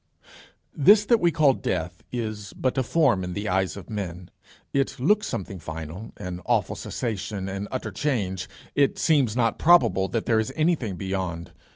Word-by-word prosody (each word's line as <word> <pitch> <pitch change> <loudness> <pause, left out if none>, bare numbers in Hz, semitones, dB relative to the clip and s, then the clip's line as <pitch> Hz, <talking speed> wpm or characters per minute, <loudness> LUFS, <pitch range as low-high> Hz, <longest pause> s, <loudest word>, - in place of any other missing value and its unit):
This 205 +8 +6
that 235 +1 +4
we 175 - +4
call 155 -4 +4
death, 90 -7 -3
is 110 -4 -4
but 130 - -1
a 130 - +2
form 130 - +2
in 90 0 -4
the 100 +3 -3
eyes 95 0 0
of 95 - -9
men. 90 -5 -5 0.4
It 135 0 0
looks 210 +11 +3
something 95 0 -5
final, 80 +6 -7
an 90 -3 -6
awful - - +1
cessation, 105 -4 -4
an 100 +1 -4
utter 130 - -4
change. 100 -11 -2 0.2
It 140 -1 +2
seems 140 -9 +2
not 115 -2 +1
probable 160 - +5
that 110 +4 -2
there 115 -2 +3
is 110 +4 -1
anything 155 - +1
beyond. 90 -2 -4
110 Hz, 170 wpm, -25 LUFS, 95-135 Hz, 0.4 s, This